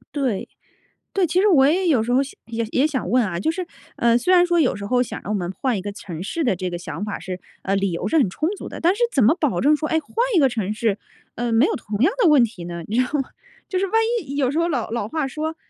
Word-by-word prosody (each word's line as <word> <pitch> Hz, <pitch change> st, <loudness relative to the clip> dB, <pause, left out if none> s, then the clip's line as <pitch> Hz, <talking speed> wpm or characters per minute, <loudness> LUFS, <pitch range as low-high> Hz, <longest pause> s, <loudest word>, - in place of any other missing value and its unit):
对， 255 Hz, -9 st, -1 dB, 0.7 s
对， 380 Hz, -3 st, +2 dB
其 355 Hz, +4 st, +1 dB
实 420 Hz, -, +3 dB
我 275 Hz, -8 st, +5 dB
也 360 Hz, +5 st, +2 dB
有 255 Hz, -9 st, +3 dB
时 245 Hz, +2 st, -2 dB
候 260 Hz, -, +4 dB
想， 275 Hz, -, -7 dB
也 230 Hz, 0 st, -3 dB
也 275 Hz, +4 st, +3 dB
想 265 Hz, -, -3 dB
问 245 Hz, +2 st, +3 dB
啊， 170 Hz, -4 st, -3 dB
就 200 Hz, -, 0 dB
是， 365 Hz, +1 st, -4 dB, 0.3 s
呃， 235 Hz, 0 st, +3 dB
虽 365 Hz, +9 st, +2 dB
然 355 Hz, -, +6 dB
说 345 Hz, -1 st, +2 dB
有 265 Hz, -10 st, +2 dB
时 200 Hz, 0 st, -7 dB
候 250 Hz, +4 st, +1 dB
想 -, -, -6 dB
让 210 Hz, -, -4 dB
我 210 Hz, -, +1 dB
们 175 Hz, -2 st, -3 dB
换 245 Hz, -1 st, -1 dB
一 -, -, -3 dB
个 205 Hz, +1 st, -5 dB
城 175 Hz, -5 st, -8 dB
市 315 Hz, -, -3 dB
的 240 Hz, -9 st, +1 dB
这 185 Hz, 0 st, -3 dB
个 175 Hz, -, -4 dB
想 175 Hz, +1 st, -5 dB
法 210 Hz, -, -4 dB
是， 185 Hz, -1 st, -6 dB, 0.2 s
呃， 195 Hz, +1 st, 0 dB
理 195 Hz, -2 st, 0 dB
由 180 Hz, +4 st, -2 dB
是 320 Hz, -, +2 dB
很 250 Hz, -, +3 dB
充 310 Hz, -, -2 dB
足 -, -, -8 dB
的， -, -, -8 dB
但 350 Hz, +3 st, +3 dB
是 480 Hz, -, -3 dB
怎 270 Hz, -, +4 dB
么 250 Hz, -, +5 dB
保 255 Hz, -, 0 dB
证 300 Hz, +3 st, +4 dB
说， 310 Hz, 0 st, -3 dB
哎， 320 Hz, -, +1 dB
换 290 Hz, -, -22 dB, 0.2 s
一 -, -, +6 dB
个 270 Hz, -, +5 dB
城 215 Hz, -4 st, -2 dB
市， 215 Hz, -2 st, 0 dB, 0.4 s
呃， 235 Hz, -1 st, -2 dB
没 230 Hz, +6 st, +5 dB
有 -, -, -1 dB
同 210 Hz, -2 st, -5 dB
样 280 Hz, -, +4 dB
的 380 Hz, -, +5 dB
问 295 Hz, -5 st, +6 dB
题 210 Hz, -7 st, -6 dB
呢， 170 Hz, 0 st, -6 dB
你 220 Hz, -, -2 dB
知 255 Hz, -, +4 dB
道 -, -, -11 dB
吗？ 265 Hz, -, -5 dB, 0.4 s
就 375 Hz, -, -1 dB
是 390 Hz, -, +1 dB
万 370 Hz, -, -11 dB, 0.3 s
一 280 Hz, -4 st, -8 dB
有 265 Hz, -3 st, +2 dB
时 305 Hz, -, -1 dB
候 335 Hz, +1 st, +2 dB
老 250 Hz, -8 st, -2 dB
老 230 Hz, -3 st, -2 dB
话 310 Hz, -1 st, -1 dB
说： 315 Hz, +4 st, -4 dB
250 Hz, 320 characters per minute, -22 LUFS, 205-310 Hz, 0.7 s, 然